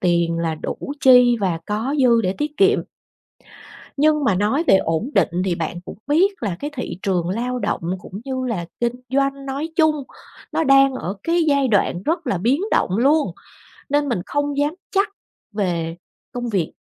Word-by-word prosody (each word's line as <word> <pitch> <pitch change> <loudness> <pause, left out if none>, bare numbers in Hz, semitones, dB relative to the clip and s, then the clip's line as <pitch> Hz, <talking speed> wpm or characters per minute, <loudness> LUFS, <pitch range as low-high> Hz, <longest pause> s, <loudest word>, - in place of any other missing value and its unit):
tiền 170 -2 +1
là 165 -1 -1
đủ - - -5 0.2
chi 250 -2 +6
và 180 -4 0
có 220 +7 -2
dư 235 -2 +5
để 185 -1 0
tiết 295 0 -3
kiệm. 395 +2 +4 1.2
Nhưng 300 0 +3
mà 215 - +3
nói 215 - +1
về 195 - +6
ổn 165 - -1
định - - +4 0.2
thì 185 -3 0
bạn 170 +1 -4
cũng - - -9
biết 360 +3 +2
là 190 -5 -2
cái 290 - -4
thị 245 -7 -5
trường 180 -3 0
lao 245 +6 -2
động - - -2 0.2
cũng 195 +3 -9
như 260 -1 -3
là 190 -9 -3
kinh 240 0 +1 0.2
doanh 275 +1 0
nói 280 +4 -3
chung, 315 -2 +4 0.6
nó 325 - +1
đang 275 -1 +5
ở 190 -6 -4
cái 335 0 +1
giai 280 -2 +3
đoạn 195 -4 +1
rất 325 - -1
là 195 - 0
biến 245 - +1
động 185 - +1
luôn, 290 +4 +3 0.6
nên 290 0 +1
mình 235 -8 -1
không 290 0 -1
dám 290 +3 +1 0.2
chắc 395 +1 +2 0.4
về 170 -5 -2 0.4
công 245 -2 -4
việc. 190 -7 -1
250 Hz, 185 wpm, -21 LUFS, 185-290 Hz, 1.2 s, chi